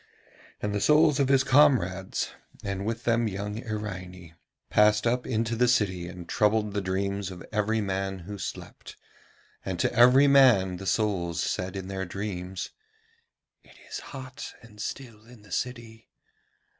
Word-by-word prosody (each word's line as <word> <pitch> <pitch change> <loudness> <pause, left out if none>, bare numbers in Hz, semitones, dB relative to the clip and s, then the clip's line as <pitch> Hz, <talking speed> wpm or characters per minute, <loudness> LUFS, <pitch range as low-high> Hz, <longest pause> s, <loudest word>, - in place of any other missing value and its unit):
And 105 0 -1
the 105 - -1
souls 150 -1 +4
of 140 - +3
his 135 -1 +4
comrades, 115 -10 +3 0.3
and 100 0 -3
with 115 +1 -3
them 115 -1 +2
young 105 +2 -4
Iraine, 95 -6 -6 0.4
passed 105 +1 +4
up 125 +1 0
into 115 -1 0
the 125 +2 +3
city 95 -8 +1
and 90 -1 -9
troubled 105 -1 +1
the 100 - -1
dreams 100 +1 -2
of 90 -2 -9
every 110 +1 +1
man 95 -1 -2
who 100 +1 -7
slept, - - -8 0.7
and 95 -2 -4
to - - +1
every 125 +4 +7
man 125 -10 +5
the 95 +1 -7
souls 90 -7 0
said 90 +1 -2
in 95 -1 -5
their 95 -1 -3
dreams: 95 -1 -5 0.9
'It - - -20 0.2
is - - -4
hot 130 0 -8
and 105 -3 -12
still 115 -4 -6
in 120 -3 -16
the 100 - -17
city. 115 0 -5
105 Hz, 155 wpm, -27 LUFS, 95-120 Hz, 0.9 s, every